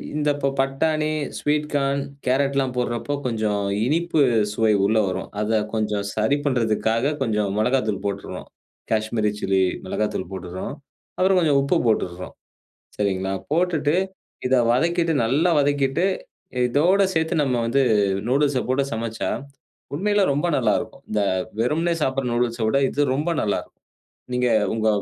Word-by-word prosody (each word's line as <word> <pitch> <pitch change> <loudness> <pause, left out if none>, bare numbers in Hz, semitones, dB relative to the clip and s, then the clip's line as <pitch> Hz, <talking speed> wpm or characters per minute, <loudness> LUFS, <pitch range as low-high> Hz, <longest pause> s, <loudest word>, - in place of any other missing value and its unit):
இந்த 150 -1 +1
இப்ப 140 -1 0
பட்டாணி, 155 +3 0 0.3
ஸ்வீட் 150 0 0
கார்ன், 140 0 +1 0.3
கேரட்லாம் 135 0 +1
போடுறப்போ 125 +3 -1
கொஞ்சம் 110 -3 -1 0.2
இனிப்பு 165 +3 +1 0.3
சுவை 110 -1 +2
உள்ள 110 +2 +2
வரும். 95 - -4
அத 110 +1 +1
கொஞ்சம் 105 -2 -1
சரி 110 +7 +2
பண்றதுக்காக 115 +1 +1
கொஞ்சம் 105 -5 0
மொளகாத்தூள் 110 -4 0
போட்டுற்றோம். 100 0 -5 0.4
காஷ்மீரி 110 -1 +1
சில்லி 95 -1 +2 0.2
மிளகாய்த்தூள் 95 -1 -2
போட்டுற்றோம். 95 +5 -5 0.5
அப்புறம் 185 0 +4
கொஞ்சம் 150 -5 +3
உப்பு 140 +6 +2
போட்டுற்றோம். 90 -4 -1 0.7
சரிங்களா, 95 -1 0 0.2
போட்டுட்டு 160 -2 +1 0.5
இத 130 - +3 0.2
வதக்கிட்டு 170 +4 +1
நல்லா 145 +9 +2
வதக்கிட்டு 145 +3 +1 0.6
இதோட 170 +10 +3
சேர்த்து 160 +1 +1
நம்ம 125 -4 +1
வந்து 135 +4 +2 0.5
நூடில்ஸ்ஸ 135 0 +2
போட்டு 130 +2 +2
சமச்சா 115 0 -3 0.7
உண்மையிலே 205 +3 +2
ரொம்ப 145 +5 0
நல்லா 115 -5 +2
இருக்கும். 110 - -9
இந்த 105 -1 0 0.4
வெறுமனே 160 +8 +1
சாப்பிடுற 130 -2 0
நூடில்ஸ்ஸ 120 -1 0
விட 135 +5 +2
இது 145 - -1
ரொம்ப 155 +5 -1
நல்லா 105 - 0
இருக்கும். - - -27 0.5
நீங்க 125 0 +2 0.3
உங்க 110 -1 +1
130 Hz, 130 wpm, -23 LUFS, 110-145 Hz, 0.7 s, அப்புறம்